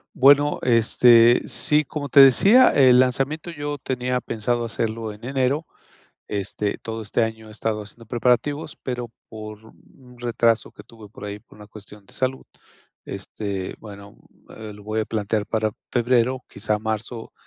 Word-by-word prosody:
Bueno, 145 +2 +5
este, 120 0 +5
sí, 150 0 +1
como 145 +2 -5
te 140 - +4
decía, 195 - +7
el 130 -3 +5
lanzamiento 135 +6 0
yo 145 -3 -5
tenía 125 -1 -2
pensado 120 +1 -2
hacerlo 115 -1 -3
en 105 +2 -12
enero. 135 +4 0 0.6
Este, 100 0 -3
todo 115 0 -6
este 110 +3 -1
año 110 -1 -4
he - - -12
estado 110 0 -3
haciendo 115 +3 -15
preparativos, 125 +6 0
pero 125 -2 -4 0.2
por 110 -1 -9
un 125 +2 -20
retraso 115 -1 0
que - - -13
tuve 110 -3 -15
por 105 - -10
ahí 100 0 -6
por 100 - -21
una 105 - -12
cuestión 105 -1 -14
de - - -18
salud, 130 0 -2 0.6
este, 100 -3 -5
bueno, 100 -2 -12 0.4
eh, 110 -1 -8
lo 105 0 -14
voy 110 +1 -2
a - - -1
plantear 105 -1 -2
para 110 -1 -1 0.2
febrero, 125 +1 +1
quizá 105 +2 -2
marzo, 110 +2 -5
115 Hz, 160 wpm, -22 LUFS, 110-130 Hz, 0.6 s, decía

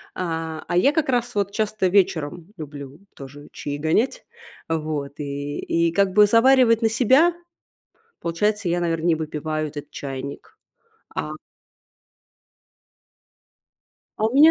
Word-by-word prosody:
А, 160 -3 -3
а 175 0 0
я 275 +10 +5
как 305 -4 0
раз 245 -2 0
вот 200 -1 0
часто 210 -2 0
вечером 175 -4 +1
люблю 145 -1 -9 0.2
тоже 140 +2 -11
чаи 145 0 -5
гонять. 220 - 0 0.4
А 160 0 0
вот 150 -2 -5
и 145 0 -4
и 170 0 +1
как 200 +1 +3
бы 210 0 +7
заваривать 235 0 +5
на 225 - +4
себя? 260 +9 +4 0.9
Получается, 205 +4 0
я, 175 +1 0
наверно, 165 -1 -1
не 170 - +4
выпиваю 155 0 -3
этот 145 0 -9
чайник, 135 0 -7 0.6
а - - -2 2.9
А 215 - 0
у 225 - -2
меня, 305 +3 +8
170 Hz, 130 wpm, -23 LUFS, 150-215 Hz, 2.9 s, меня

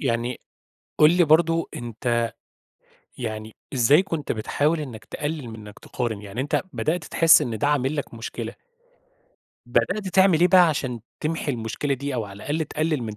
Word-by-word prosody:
يعني 120 -1 -1 0.6
قُل 150 +1 +7
لي 180 - +6
برضه 165 +1 +3
أنت 120 0 -1 0.9
يعني 110 -2 -5 0.2
إزاي 140 +8 +5
كنت 165 -6 -3
بتحاول 145 +8 0
إنك 125 -7 -7
تـقلل 145 -3 -4
من 110 - -8
إنك 105 -1 -12
تقارن؟ 115 -5 -4
يعني 105 +4 -5
أنت 140 - 0
بدأت 165 +1 -1
تحس 165 0 +5
إن 120 -6 -2
ده 145 - 0
عامل 145 0 +1
لك 145 -5 -4
مشكلة 115 0 -6 1.1
بدأت 210 -3 0
تعمل 190 -3 +4
إيه 180 - +6
بقى 180 -1 +7
عشان 130 -6 -2 0.2
تمحي 155 -1 -1
المشكلة 120 +4 -2
دي 140 +1 -4
أو 115 -3 -1
على 100 -1 -10
الأقل 150 +9 -2
تقلل 155 -2 -1
من 110 -2 -5
140 Hz, 165 wpm, -24 LUFS, 115-160 Hz, 1.1 s, قُل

